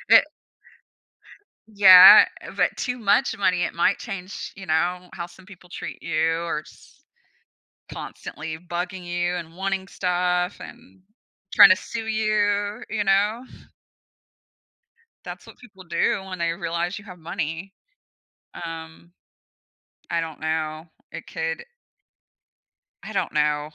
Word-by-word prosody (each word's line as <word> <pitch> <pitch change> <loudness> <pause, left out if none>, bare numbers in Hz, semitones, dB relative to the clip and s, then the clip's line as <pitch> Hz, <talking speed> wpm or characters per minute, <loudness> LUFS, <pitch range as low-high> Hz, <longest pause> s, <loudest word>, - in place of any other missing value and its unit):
It - - +8 1.4
Yeah, 190 -3 +9 0.2
eh, - - -9
but - - +1
too 250 0 -3
much 225 +2 +2
money, 180 -3 +1
it - - -4
might 170 - +2
change, 195 -3 -7
you 190 - -10
know, 180 +3 -1
how 170 - -5
some 180 +2 -18
people 180 -3 -16
treat - - -8
you 160 +1 0
or 155 -3 -3
just - - -20 0.9
constantly 155 +1 -7
bugging 175 +2 -5
you 175 0 -1
and 165 -1 -7
wanting 195 0 -3
stuff 180 0 -1
and 240 -5 -13 0.6
tryna 185 - +9
sue 225 -1 -6
you, 210 -1 0
you 215 -2 -1
know. 205 +4 +1 1.8
That's - - -9
what - - -15
people 190 -6 -15
do 170 +3 0
when 185 -1 -6
they 170 0 0
realize 170 +1 -3
you 200 - -14
have 180 -2 -11
money. 165 +2 -5 0.9
Um, 165 +1 -10 1.0
I 170 - +1
don't 160 -2 -7
know. 155 0 -3 0.3
It - - -8
could 160 0 -4 1.4
I - - -7
don't - - -2
know. 150 0 0
180 Hz, 125 wpm, -23 LUFS, 165-195 Hz, 1.8 s, Yeah